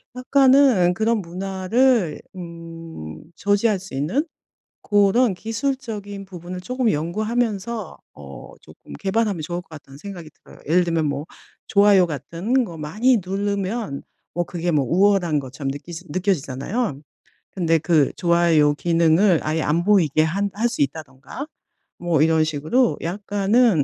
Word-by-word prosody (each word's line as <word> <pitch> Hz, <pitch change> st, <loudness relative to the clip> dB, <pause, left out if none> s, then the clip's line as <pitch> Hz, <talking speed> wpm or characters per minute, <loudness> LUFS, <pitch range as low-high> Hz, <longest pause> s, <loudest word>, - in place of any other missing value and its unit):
약간은 260 Hz, -7 st, +4 dB
그런 225 Hz, +3 st, +1 dB
문화를 190 Hz, +3 st, 0 dB, 0.2 s
음 165 Hz, -, -9 dB
저지할 205 Hz, +1 st, +1 dB
수 190 Hz, -6 st, -10 dB
있는 170 Hz, -, 0 dB, 0.6 s
고런 205 Hz, +3 st, +3 dB
기술적인 225 Hz, -3 st, -4 dB
부분을 180 Hz, 0 st, -8 dB
쪼금 250 Hz, +3 st, 0 dB
연구하면서 215 Hz, +4 st, -2 dB, 0.2 s
어 70 Hz, -1 st, -11 dB
쪼끔 -, -, -15 dB
개발하면 200 Hz, -2 st, 0 dB
좋을 175 Hz, +2 st, -4 dB
것 -, -, -35 dB
같다는 145 Hz, -3 st, -12 dB
생각이 175 Hz, -3 st, -9 dB, 0.2 s
들어요. -, -, -16 dB
예를 175 Hz, +3 st, +4 dB
들면 165 Hz, -2 st, 0 dB
뭐 145 Hz, +1 st, -2 dB, 0.4 s
좋아요 200 Hz, -3 st, +5 dB
같은 170 Hz, -, -1 dB
거 170 Hz, -7 st, -8 dB
많이 215 Hz, +12 st, +2 dB
누르면 200 Hz, -2 st, -2 dB, 0.3 s
뭐 175 Hz, -, 0 dB
그게 175 Hz, 0 st, -3 dB
뭐 145 Hz, -3 st, +2 dB
우월한 185 Hz, -4 st, +3 dB
것처럼 135 Hz, +1 st, -5 dB
느끼지 160 Hz, +5 st, -8 dB
느껴지잖아요. 175 Hz, -, -2 dB, 0.5 s
근데 165 Hz, -3 st, +1 dB
그 155 Hz, -3 st, +2 dB
좋아요 170 Hz, -4 st, +3 dB
기능을 170 Hz, +2 st, +3 dB
아예 155 Hz, +1 st, -1 dB
안 165 Hz, +4 st, +1 dB
보이게 170 Hz, -7 st, +3 dB
한 200 Hz, +5 st, -1 dB
할 225 Hz, +3 st, +1 dB
수 240 Hz, -, -4 dB
있다든가 140 Hz, -, -4 dB, 0.5 s
뭐 170 Hz, -4 st, +1 dB
이런 160 Hz, 0 st, +3 dB
식으로 155 Hz, -, +1 dB
약간은 200 Hz, -, +2 dB
180 Hz, 290 characters per minute, -22 LUFS, 160-210 Hz, 0.6 s, 좋아요